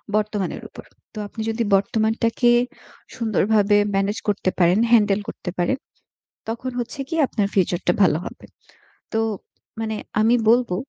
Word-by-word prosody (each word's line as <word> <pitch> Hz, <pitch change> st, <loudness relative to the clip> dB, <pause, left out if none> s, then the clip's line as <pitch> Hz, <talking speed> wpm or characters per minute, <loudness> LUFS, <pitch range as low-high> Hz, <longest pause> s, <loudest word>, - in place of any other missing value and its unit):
বর্তমানের 210 Hz, -3 st, -1 dB
উপর। -, -, -12 dB, 0.3 s
তো -, -, -12 dB
আপনি 220 Hz, -, -7 dB
যদি 225 Hz, +1 st, -1 dB
বর্তমানটাকে 225 Hz, +4 st, +1 dB, 0.7 s
সুন্দরভাবে 215 Hz, -3 st, +2 dB, 0.2 s
ম্যানেজ 195 Hz, +2 st, 0 dB
করতে 205 Hz, -2 st, +1 dB
পারেন, 180 Hz, +3 st, +4 dB
হ্যান্ডেল 210 Hz, -3 st, +4 dB
করতে -, -, -6 dB
পারেন, 175 Hz, +9 st, +1 dB, 0.7 s
তখন 235 Hz, +3 st, -4 dB
হচ্ছে 245 Hz, +4 st, -5 dB
কি? -, -, -2 dB
আপনার 210 Hz, -5 st, 0 dB
ফিউচারটা 180 Hz, -2 st, +1 dB
ভালো 175 Hz, -5 st, +4 dB
হবে। -, -, -9 dB, 0.7 s
তো 220 Hz, -, +1 dB, 0.6 s
মানে 220 Hz, -1 st, -2 dB, 0.3 s
আমি 225 Hz, +3 st, +4 dB
বলবো 235 Hz, -5 st, +3 dB
215 Hz, 130 wpm, -22 LUFS, 195-230 Hz, 0.7 s, পারেন